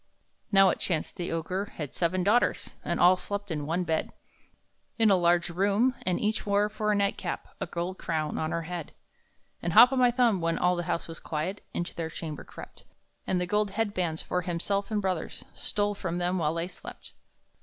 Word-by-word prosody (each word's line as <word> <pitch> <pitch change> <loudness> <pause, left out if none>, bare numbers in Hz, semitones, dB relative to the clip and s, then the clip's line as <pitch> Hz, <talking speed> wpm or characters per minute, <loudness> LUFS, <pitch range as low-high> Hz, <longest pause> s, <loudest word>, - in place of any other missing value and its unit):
Now 195 -1 +7
it - - 0
so - - 0
chanced 165 -5 -1
the 175 -2 -3
Ogre 185 +5 -3
had 150 -4 -5
seven 180 +1 0
daughters, 220 +6 +2
And - - -1
all 180 +1 +7
slept 205 0 -5
in 150 -2 -3
one 170 +3 0
bed, 160 -2 -1 0.9
In 225 -3 +5
a - - +7
large 175 -1 +2
room, 200 +8 +2
and 180 - +2
each 215 +1 0
wore 205 +1 +2
for 215 0 -1
a - - +2
nightcap 200 0 -1
A 195 - -3
gold 175 +3 -4
crown 155 -3 -2
on 155 - -1
her 170 0 -2
head. 175 -1 -6 0.7
And 170 - -2
Hop 240 +4 +9
o' - - 0
my 250 -1 +5
Thumb, 240 -6 +2
when 165 0 0
all 180 0 +2
the 175 -1 -3
house - - -1
was 165 -1 -6
quiet, 165 +6 -4
Into 175 - -3
their 165 -1 -4
chamber 155 -2 -6
crept, - - -12 0.4
And 185 - +1
the 180 - 0
gold 210 +3 +1
head 205 +1 -1
bands 170 -4 -1
for 180 - -1
himself 180 +4 -2
and 210 -2 -1
brothers 185 -4 -3
Stole 205 0 0
from 175 -4 -3
them 180 +1 0
while 155 0 0
they 170 +1 -2
slept. 185 - -11
180 Hz, 210 wpm, -28 LUFS, 170-205 Hz, 0.9 s, Hop